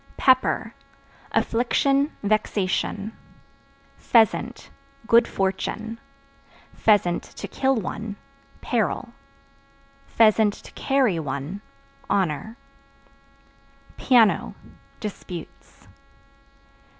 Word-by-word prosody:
Pepper 260 -1 +2 0.6
Affliction, 275 +5 +1
vexation. 205 0 -1 0.8
Pheasant 230 +1 +1 0.3
Good 235 +1 +5
fortune; 220 +4 -3 0.8
(to 200 -5 +1
kill 265 0 +1
one) 215 0 -4 0.5
peril; - - -1 1.0
(to 215 -2 +3
carry 260 -11 +1
one) 145 +6 -5 0.5
honor. 195 - -1 1.4
Piano 235 -5 +3 0.4
Disputes. 185 -5 -9
215 Hz, 55 wpm, -24 LUFS, 195-235 Hz, 1.4 s, Good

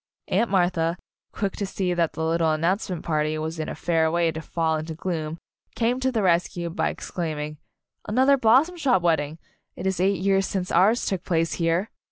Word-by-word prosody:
Aunt 235 - +2
Martha, 175 -3 +1 0.3
quick 200 -2 -2
to 200 - -1
see 185 -2 -1
that 170 -2 0
the 160 - -2
lit 165 +1 +1
tle 160 -1 +3
announcement 175 +2 -1
party 155 -1 0
was 160 +1 -4
in 155 - -3
a - - -5
fair 160 0 +1
way 170 0 +1
to 160 0 -6
fall 160 -1 -1
into 155 +1 -5
gloom, 160 -2 -3 0.4
came 240 +2 +1
to 260 0 +1
the 225 -4 0
rescue 170 -1 +1
by 175 - 0
exclaiming, 150 -3 -4 0.5
"Another 260 +6 +4
Blossom 270 +8 +4
Shop 255 - +2
wed 165 -3 +3
ding 145 +2 -5 0.4
I - - -7
It - - -5
is 190 -1 0
eight 195 +1 +2
years 195 0 +2
since 185 -2 -3
ours 215 +6 +4
took 190 -3 -2
place 165 -2 0
here!" 170 +6 +1
175 Hz, 205 wpm, -25 LUFS, 160-195 Hz, 0.5 s, Another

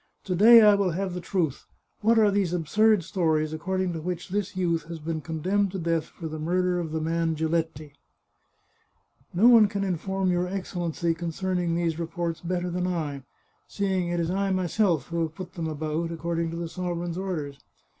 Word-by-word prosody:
To 185 - -2
day 225 +5 +8
I 210 -1 +7
will 200 -4 +1
have 190 +1 -2
the 180 - -4
truth. 170 -6 -2 0.3
What 225 +2 +3
are 215 -2 +5
these 195 -3 0
absurd 205 +4 +3
stories 160 -4 0
according 185 +2 -2
to 165 - -5
which 175 +1 -4
this 205 0 -2
youth 170 -3 0
has 165 +1 -7
been 160 0 -4
condemned 185 +5 0
to - - -2
death 165 -2 0
for 165 0 -8
the 155 0 -6
murder 180 +2 +1
of 165 -3 -4
the 160 - -1
man 165 0 0
Giletti? 160 -2 -2 0.5
" - - -42
" - - -26
No 210 +7 +6
one 230 -4 +8
can 200 -1 -3
inform 190 +1 -1
your 175 0 0
Excellency 175 -3 -2
concerning 175 +1 -2
these 170 -1 -1
reports 170 0 -3
better 180 0 -2
than 180 +1 -1
I, 155 -6 -3 0.5
seeing 190 -3 -1
it 175 0 -1
is 170 0 0
I 195 +1 0
myself 185 - +1
who 170 0 -1
have 160 -1 -2
put 185 0 -8
them 165 -2 -3
about, 155 +2 -2
according 165 0 -2
to 165 - -5
the 170 0 -3
sovereign's 175 -1 -4
orders. 155 -8 -4
175 Hz, 195 wpm, -26 LUFS, 165-190 Hz, 0.5 s, day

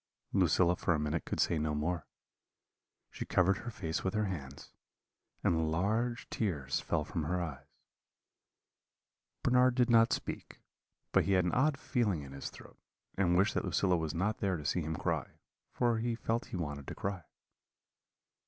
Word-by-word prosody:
"Lucilla 90 -1 +4
for 85 - +1
a - - -1
minute 75 +2 -1
could - - -3
say 85 - +2
no 75 0 0
more; 80 +2 -2 1.0
she - - -5
covered 95 +1 +3
her 120 - -6
face 80 -8 -3
with 95 +2 -1
her 110 0 +2
hands, 70 -8 -6 0.7
and 80 -2 +2
large 110 +8 0
tears 75 - -1
fell 75 -3 -1
from 85 - -3
her 90 +3 0
eyes. 70 -6 -5 1.8
Bernard 125 0 +4
did 125 -1 +3
not 115 -1 +6
speak, - - -4 0.5
but - - +4
he 100 - +2
had 90 -2 +4
an 90 - +1
odd 140 +3 +3
feeling 105 - 0
in 70 - -10
his 70 0 -5
throat, - - -14 0.4
and 90 -2 +3
wished 100 +4 +3
that - - 0
Lucilla 95 -2 +2
was 80 -2 -2
not 105 +6 0
there 95 -3 0
to 75 - -8
see 90 - +1
him 80 0 -3
cry, - - -1 0.4
for 120 -2 +1
he 115 0 -1
felt 115 0 -1
he - - -6
wanted 75 -4 -4
to - - -5
cry. 95 -2 -3
90 Hz, 170 wpm, -33 LUFS, 80-110 Hz, 1.8 s, not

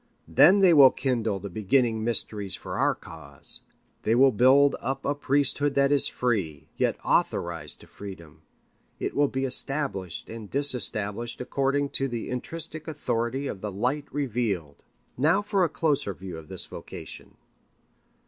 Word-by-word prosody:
Then 180 - +6
they 185 -3 +6
will 140 -4 +9
kindle 115 -7 -1
the 100 - -6
beginning 110 +3 +1
mysteries 105 -3 0
for - - -6
our - - +2
cause. 75 -4 -5 0.4
They 110 - +1
will 135 +2 +6
build 130 +5 +5
up 135 +1 -4
a 140 - +1
priesthood 145 0 +1
that 140 0 +3
is 145 - +4
free, 95 - -2
yet - - 0
authorized 85 -4 -1
to - - -15
freedom. 95 -6 -11 0.6
It - - -3
will 145 0 +3
be 135 0 -2
established 130 - -1
and 110 -2 -9
disestablished 120 -5 +1
according 140 +2 0
to 135 - +1
the 120 -2 -5
intrinsic 155 +5 -6
authority 135 -3 -2
of 100 -8 -5
the 105 - -4
light 125 +9 -2
revealed. 110 - -2 0.4
Now 160 +9 +3
for 200 -2 +1
a 170 - +2
closer 145 - 0
view 95 -2 -8
of 80 -1 -10
this - - -5
vocation. - - -10
125 Hz, 150 wpm, -26 LUFS, 100-140 Hz, 0.6 s, will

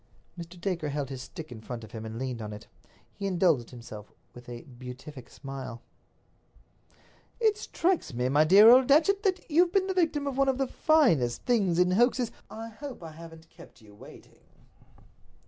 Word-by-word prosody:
Mr. 170 0 -10
Dacre 170 -4 -2
held 140 -1 -3
his 130 -2 -6
stick 155 +2 -9
in 110 -2 -9
front 115 0 -7
of 110 - -12
him 110 -2 -7
and 110 +1 -7
leaned 125 -2 -4
on 105 -1 -6
it. 105 - -10 0.5
He 200 - -4
indulged 170 -10 +1
himself 110 -4 -11 0.2
with 120 0 -13
a 120 -1 -8
beatific 130 +1 -11
smile. 135 -4 -8 1.6
"It 440 -3 +3
strikes 370 - -1
me, 125 0 -1
my 145 +4 +4
dear 210 +10 +8
Datchet, 315 +9 +3
that 380 -3 -1
you've 345 +2 +3
been 385 -1 +2
the 380 - -2
victim 320 -5 0
of 275 -1 -3
one 275 0 +4
of 265 - 0
the 270 - +1
finest 230 - +2
things 200 -9 +1
in 180 0 +3
hoaxes—" 240 +4 +2 0.2
"I 225 +1 -8
hope 250 -2 -9
I 160 - -8
haven't 165 0 -13
kept 165 -7 -16
you 105 -2 -17
waiting." 105 - -15
170 Hz, 180 wpm, -28 LUFS, -, 1.6 s, dear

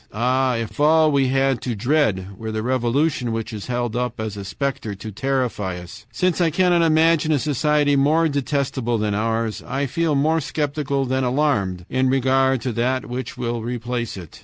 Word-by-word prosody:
"Ah! 125 +3 +1
if 115 +2 -5
all 155 +1 +5
we 140 -2 +2
had 135 -1 +1
to 120 -3 -3
dread 110 -5 +1
were 110 +3 -6
the 110 0 -3
revolution 130 +1 0
which 115 0 -4
is 105 -2 -6
held 120 -2 -2
up 125 -1 -2
as 110 -2 -4
a 100 - -6
specter 110 +1 -3
to 110 +3 -8
terrify 120 -6 -2
us! 95 +5 -11
Since 180 +10 0
I 170 - +4
cannot 175 +1 +3
imagine 160 -1 +3
a 150 - +3
society 150 +1 +2
more 155 +4 +3
detestable 140 -4 -1
than 105 -1 -1
ours, 115 +1 -1
I 135 +3 -2
feel 160 +2 0
more 160 +3 +2
skeptical 140 -1 -1
than 130 +1 0
alarmed 125 - 0
in 130 0 +1
regard 130 -1 +2
to 125 - -2
that 125 +3 0
which 125 0 -5
will 120 -1 -2
replace 120 -1 -3
it. 85 -5 -11
130 Hz, 185 wpm, -22 LUFS, 115-145 Hz, -, all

